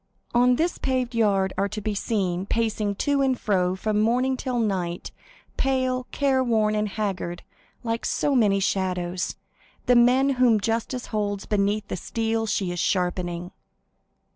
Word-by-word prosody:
On 245 +1 +4
this 335 +6 -1
paved 255 -2 -1
yard 200 -4 +2
are 200 - +1
to 215 - -5
be 210 0 -2
seen,—pacing 205 +1 -1
to 285 +6 +1
and 260 -2 +1
fro 185 -3 +1
from 210 +2 0
morning 250 +4 +2
till 255 -1 -3
night, 185 -6 -2 0.5
pale, 255 -1 0
careworn, 250 -6 +1
and 210 0 0
haggard, 190 -4 -3 0.4
like 230 -1 -2
so 285 - 0
many 210 -6 +3
shadows,—the 185 +4 -2
men 250 +3 +5
whom 235 -4 +5
justice 230 +4 -2
holds 205 -2 -1
beneath 205 0 0
the - - -4
steel 225 +3 -2
she 190 -3 -1
is 175 - -4
sharpening. 175 -1 -1
215 Hz, 140 wpm, -25 LUFS, 195-245 Hz, 0.5 s, men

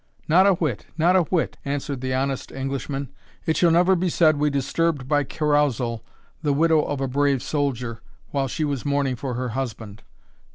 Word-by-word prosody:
"Not 185 +5 +5
a 200 - +6
whit 150 -10 -2
not 170 +3 +4
a 185 - +6
whit," 170 0 -1
answered 140 -2 -3
the 130 0 -2
honest 135 +1 -2
Englishman; 135 0 -4 0.3
"it 160 - +1
shall 175 - +4
never 175 +3 +4
be 180 +1 0
said 155 -2 +3
we 150 +1 +2
disturbed 140 0 -1
by 145 0 +2
carousal 140 -6 0 0.4
the 145 -3 +1
widow 160 +1 +4
of 145 -2 -3
a 135 - 0
brave 140 0 +1
soldier, 125 -6 -2 0.3
while 135 -1 0
she 155 - -2
was 140 -4 -2
mourning 140 -2 0
for 125 0 -4
her 125 0 -2
husband. 110 -4 -5
140 Hz, 180 wpm, -23 LUFS, 130-155 Hz, 0.4 s, a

